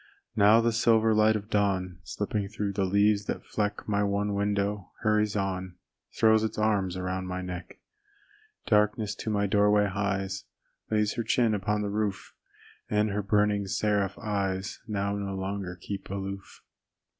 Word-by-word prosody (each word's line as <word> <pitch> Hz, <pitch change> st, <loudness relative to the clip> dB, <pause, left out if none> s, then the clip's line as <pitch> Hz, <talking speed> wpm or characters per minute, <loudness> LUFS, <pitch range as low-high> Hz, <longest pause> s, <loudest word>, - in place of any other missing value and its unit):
Now 110 Hz, +2 st, +6 dB
the 115 Hz, 0 st, +2 dB
silver 115 Hz, -1 st, +3 dB
light 110 Hz, 0 st, +4 dB
of 105 Hz, +1 st, -5 dB
dawn 95 Hz, -4 st, 0 dB
Slipping 105 Hz, +1 st, -3 dB
through 105 Hz, -2 st, -3 dB
the 100 Hz, 0 st, 0 dB
leaves 100 Hz, +2 st, +3 dB
that -, -, -4 dB
fleck 105 Hz, -1 st, -2 dB
My 100 Hz, -1 st, +1 dB
one 100 Hz, +1 st, 0 dB
window, 100 Hz, -1 st, -1 dB
hurries 105 Hz, -1 st, +2 dB
on, 95 Hz, -2 st, -2 dB, 0.4 s
Throws 110 Hz, -1 st, +5 dB
its 110 Hz, -, -2 dB
arms 100 Hz, -4 st, +1 dB
around 95 Hz, 0 st, -3 dB
my 90 Hz, 0 st, -4 dB
neck. 90 Hz, 0 st, -7 dB, 0.9 s
Darkness 105 Hz, 0 st, +2 dB
to 110 Hz, -, -5 dB
my 100 Hz, -1 st, +1 dB
doorway 105 Hz, +1 st, +3 dB
hies, 95 Hz, -1 st, -2 dB, 0.4 s
Lays 105 Hz, -1 st, +1 dB
her 115 Hz, -, 0 dB
chin 115 Hz, 0 st, +2 dB
upon 105 Hz, +1 st, 0 dB
the 100 Hz, -, -2 dB
roof, 105 Hz, -1 st, -2 dB, 0.6 s
And 105 Hz, 0 st, +1 dB
her 105 Hz, +1 st, -1 dB
burning 105 Hz, 0 st, +1 dB
seraph 100 Hz, 0 st, 0 dB
eyes 95 Hz, -2 st, -2 dB
Now 100 Hz, -2 st, -1 dB
no 100 Hz, -1 st, -3 dB
longer 95 Hz, -1 st, -4 dB
keep 100 Hz, +3 st, -6 dB
aloof. 100 Hz, 0 st, -6 dB
100 Hz, 155 wpm, -28 LUFS, 95-105 Hz, 0.9 s, Now